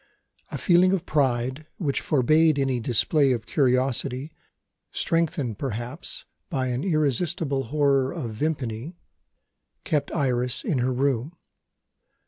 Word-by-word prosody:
A - - -4
feeling 185 +1 +4
of 185 -4 -1
pride 130 0 0
which 145 -7 -1
forbade 155 +3 +3
any 135 -3 +1
display 130 +4 +2
of 115 -2 -4
curiosity, 130 +1 0 0.6
strengthened 150 -9 -1
perhaps 125 - -5 0.2
by 130 -4 -1
an 125 +3 -2
irresistible 155 -3 0
horror 140 0 +2
of 140 -10 -4
Vimpany, 135 +3 -3 0.9
kept 150 -6 -1
Iris 125 -4 0
in 140 - 0
her 125 +1 +1
room. 135 +4 -1
135 Hz, 110 wpm, -25 LUFS, 125-155 Hz, 0.9 s, feeling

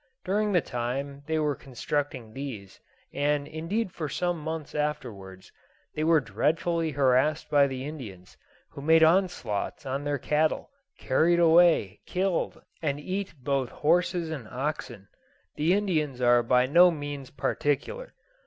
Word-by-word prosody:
During 205 +2 +1
the 180 -3 +3
time 135 +4 -4
they 160 0 0
were 150 -2 +1
constructing 130 -3 -4
these, 115 -8 -7 0.3
and 145 0 0
indeed 180 +7 -3
for 155 -4 -5
some 175 +2 -1
months 160 0 -5
afterwards, 120 -11 -4 0.4
they 155 - -2
were 160 0 +5
dreadfully 160 +8 0
harassed 140 +2 +2
by 145 -1 +5
the 130 0 -5
Indians, 110 - -9 0.4
who - - -9
made 160 +2 +5
onslaughts 165 - +1
on 135 +2 -3
their 145 0 -1
cattle, 150 - 0 0.3
carried 165 +6 +2
away, 165 - +4
killed, 185 -1 -1 0.2
and 145 -3 -1
eat 185 +2 -4
both 135 -2 0
horses 170 +1 +1
and 135 -8 -6
oxen. 130 -5 -4 0.5
The 160 +5 +2
Indians 155 -10 -1
are 120 -1 +5
by 125 +1 +3
no 170 +7 +6
means 145 -4 -5
particular. 145 - -2
150 Hz, 135 wpm, -27 LUFS, 130-165 Hz, 0.5 s, no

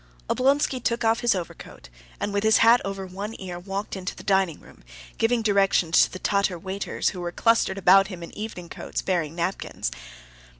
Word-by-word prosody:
Oblonsky 270 0 +2
took 235 0 0
off 225 +1 +3
his 240 -4 +2
overcoat, 170 - -8 0.3
and 205 - -3
with 200 0 0
his 220 0 +5
hat 235 +2 +6
over 195 -1 -4
one 200 +4 -6
ear 180 -2 -6
walked 195 +3 -5
into 185 0 -5
the - - -11
dining 190 -5 +1
room, - - -18 0.4
giving 230 0 +2
directions 195 -5 +3
to - - +3
the - - -6
Tatar 200 -1 0
waiters, 190 +3 -2
who 180 - -7
were 175 0 -3
clustered 225 -1 +2
about 195 +1 +6
him 180 -4 -8
in 170 - -10
evening 210 -5 -6
coats, - - -5
bearing 170 -4 -1
napkins. 175 +3 -3
195 Hz, 185 wpm, -25 LUFS, 180-220 Hz, 0.4 s, hat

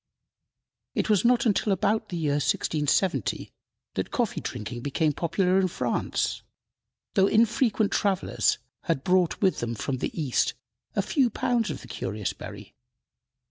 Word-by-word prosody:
It - - +1
was 205 - +4
not 245 +1 +4
until 210 -1 +2
about 210 +3 +1
the 175 - -3
year 155 -3 0
1670 155 +6 0 0.4
that - - -2
coffee 240 -4 -1
drinking 120 0 -5
became 150 +3 +1
popular 180 +4 +1
in 190 - +3
France, 180 - -1 0.7
though 195 -2 +4
infrequent 225 -1 +3
travelers 195 -3 +1 0.3
had 165 -7 0
brought 180 -2 +2
with 190 - +3
them 120 0 -2
from 130 +4 -2
the 145 - -4
East 140 -6 +1 0.4
a - - +2
few 270 -6 +2
pounds 230 -1 0
of 150 - -5
the - - -12
curious 105 -2 -3
berry. - - -10
185 Hz, 140 wpm, -27 LUFS, 150-215 Hz, 0.7 s, was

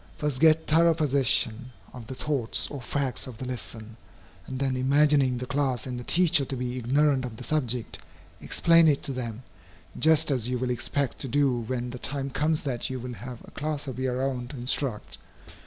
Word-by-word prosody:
First 145 -3 -2
get 160 0 +5
thorough 165 +1 +4
possession 130 -5 +1 0.2
of 120 -4 -10
the 130 - -6
thoughts 135 -5 +2
or 140 - -6
facts 135 +1 0
of 125 -4 -9
the 130 - -6
lesson, 115 -3 -7 0.5
and 130 - -5
then, 135 -1 0
imagining 135 0 +3
the 125 - -4
class 135 -3 -1
and 125 -2 -5
the - - -7
teacher 170 0 +3
to 135 - -4
be 125 0 -3
ignorant 135 +2 +2
of 120 -3 -6
the 125 - -8
subject, 125 -5 -2 0.4
explain 170 -1 +4
it 145 -3 +2
to 140 - -4
them, 120 -2 -5 0.6
just 160 -1 +4
as 125 -3 0
you 125 - 0
will 125 0 -1
expect 125 +3 -2
to 135 - -3
do 140 0 +2
when 120 +1 -3
the 125 - -7
time 140 +1 -4
comes 155 +3 0
that 125 -4 -2
you 130 -1 -4
will 125 +1 -6
have 120 0 -9
a - - -13
class 150 -1 -3
of 130 -1 -5
your 130 0 -1
own 125 -3 -2
to 140 - -9
instruct. 125 -2 -3
130 Hz, 200 wpm, -27 LUFS, 125-145 Hz, 0.6 s, get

